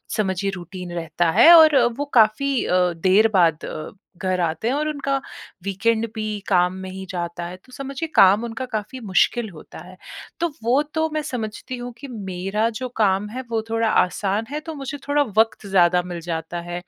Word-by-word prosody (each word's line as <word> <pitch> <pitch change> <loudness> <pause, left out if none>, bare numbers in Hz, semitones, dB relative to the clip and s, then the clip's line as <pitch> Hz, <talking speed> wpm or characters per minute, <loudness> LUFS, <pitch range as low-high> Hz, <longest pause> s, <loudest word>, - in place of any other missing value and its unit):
समझिए 195 -1 -1
रूटीन 180 0 -8
रहता 170 0 -1
है 235 - +7
और 315 -2 +7 0.2
वो 290 - -2
काफ़ी 245 +3 +3
अ, - - -1 0.2
देर 190 +6 +4
बाद 170 -4 +3
अ, 155 - -6 0.3
घर 185 +1 -1
आते 165 +5 -1
हैं 245 - +1
और 305 +1 -1
उनका 280 -2 -2 0.4
वीकेंड 220 +4 0
भी 215 -1 -3 0.2
काम 180 -2 +3
में 190 - -6
ही 190 0 -7
जाता 175 -1 -4
है। 175 +1 -7
तो 255 - -20
समझिए 275 +4 -5
काम 195 +4 +6
उनका 235 +2 -4
काफ़ी 215 +4 -4
मुश्किल 220 +2 +1
होता 165 -5 -12
है। 185 +1 -14 0.4
तो 340 0 +1
वो 250 +5 +3
तो 320 0 +1
मैं 310 - 0
समझती 250 -1 -5
हूँ 245 0 -6
कि 280 - -9
मेरा 200 0 -2
जो 255 -1 -4
काम 200 -1 +2
है, 250 +4 -5
वो 225 -1 0
थोड़ा 225 0 +1
आसान 200 +3 +1
है 300 - -2
तो - - -4
मुझे 280 0 -6
थोड़ा 290 0 +3
वक़्त 220 -1 +2
ज़्यादा 180 -2 +4
मिल 175 -1 -6
जाता 165 +1 -3
है। 175 0 -4
210 Hz, 190 wpm, -22 LUFS, 180-255 Hz, 0.4 s, है